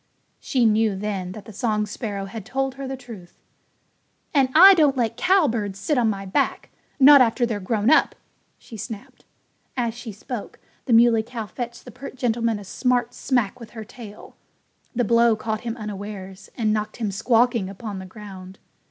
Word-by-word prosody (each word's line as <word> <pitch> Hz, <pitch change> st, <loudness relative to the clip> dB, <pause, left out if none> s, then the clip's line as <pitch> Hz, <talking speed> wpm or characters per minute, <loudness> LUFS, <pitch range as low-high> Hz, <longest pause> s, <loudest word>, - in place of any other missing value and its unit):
She 250 Hz, -3 st, +1 dB
knew, 220 Hz, -1 st, +3 dB
then, 190 Hz, -2 st, -4 dB
that 215 Hz, -, -10 dB
the 220 Hz, -, -11 dB
song 210 Hz, -1 st, 0 dB
sparrow 210 Hz, -2 st, -5 dB
had 205 Hz, +2 st, -7 dB
told 265 Hz, +4 st, -2 dB
her 270 Hz, 0 st, -7 dB
the 265 Hz, 0 st, -5 dB
truth. 225 Hz, -9 st, -12 dB, 1.0 s
"And 275 Hz, -3 st, +3 dB
I 380 Hz, +5 st, +10 dB
don't 295 Hz, -6 st, +3 dB
let 230 Hz, -2 st, 0 dB
cowbirds 240 Hz, -, +1 dB
sit 295 Hz, +9 st, -1 dB
on 240 Hz, -4 st, +2 dB
my 195 Hz, -2 st, -3 dB
back 190 Hz, -, -1 dB, 0.3 s
not 280 Hz, 0 st, +9 dB
after 240 Hz, 0 st, +3 dB
they're 225 Hz, -3 st, -3 dB
grown 215 Hz, +5 st, +1 dB
up!" -, -, +4 dB, 0.4 s
she 225 Hz, -, -12 dB
snapped. 210 Hz, 0 st, -9 dB, 0.5 s
As 235 Hz, -2 st, 0 dB
she 240 Hz, -1 st, -8 dB
spoke, 210 Hz, +2 st, -7 dB, 0.3 s
the 250 Hz, -, +1 dB
Muley 230 Hz, -1 st, +6 dB
Cow 230 Hz, 0 st, -6 dB
fetched 235 Hz, +2 st, -7 dB
the 250 Hz, -, -10 dB
pert 260 Hz, +4 st, -9 dB
gentleman 230 Hz, -3 st, 0 dB
a 205 Hz, -, -9 dB
smart 245 Hz, +3 st, 0 dB
smack 245 Hz, -7 st, -1 dB
with 230 Hz, -, -10 dB
her 220 Hz, -, -5 dB
tail. 220 Hz, -3 st, -12 dB, 0.6 s
The 245 Hz, -, +2 dB
blow 235 Hz, 0 st, +4 dB
caught 215 Hz, 0 st, -3 dB
him 235 Hz, 0 st, -4 dB
unawares 200 Hz, -2 st, -7 dB
and 215 Hz, -3 st, +1 dB
knocked 215 Hz, 0 st, -3 dB
him 220 Hz, -4 st, -2 dB
squawking 230 Hz, -1 st, +2 dB
upon 200 Hz, 0 st, -7 dB
the 190 Hz, -, -8 dB
ground. 190 Hz, -2 st, -11 dB
225 Hz, 180 wpm, -23 LUFS, 205-245 Hz, 1.0 s, I